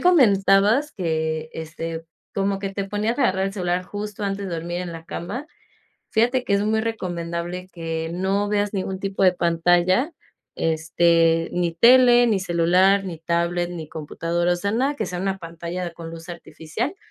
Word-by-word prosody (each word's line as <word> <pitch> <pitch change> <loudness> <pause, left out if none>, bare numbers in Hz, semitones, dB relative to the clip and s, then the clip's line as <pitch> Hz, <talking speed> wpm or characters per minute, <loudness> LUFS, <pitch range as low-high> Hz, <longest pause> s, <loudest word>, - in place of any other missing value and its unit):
comentabas 220 - +4
que, 160 -3 -2
este, 160 0 -5 0.3
como 195 0 0
que 195 0 -3
te 195 0 -3
ponías 215 +5 -1
a - - +3
agarrar 190 +1 +2
el 195 - -4
celular 180 -1 -1
justo 210 +2 -6
antes 200 0 -2
de 175 - -3
dormir 175 +2 -3
en 175 -2 -6
la 165 0 -9
cama, 245 - -5 0.6
fíjate 245 +3 +2
que 200 - 0
es 200 - +2
muy 220 +1 +1
recomendable 175 -4 -4
que 165 -1 -4
no 195 +3 0
veas 205 0 0
ningún 190 0 -2
tipo 195 0 -3
de 185 -1 +6
pantalla, 175 - +2 0.5
este, 165 +1 +2
ni 175 -1 0
tele, 245 +3 +6
ni 210 -4 +2
celular, 185 +3 +3
ni 170 -4 -6
tablet, 170 +1 0
ni 165 -3 -7
computadora, 170 +3 -1
o - - -3
sea, 200 +3 -2
nada 270 +5 +1
que - - -2
sea 180 -1 -4
una 195 0 -1
pantalla 170 +1 -5
con 165 -1 -9
luz 165 +1 -10
artificial, 175 - -5
180 Hz, 170 wpm, -23 LUFS, 170-205 Hz, 0.6 s, de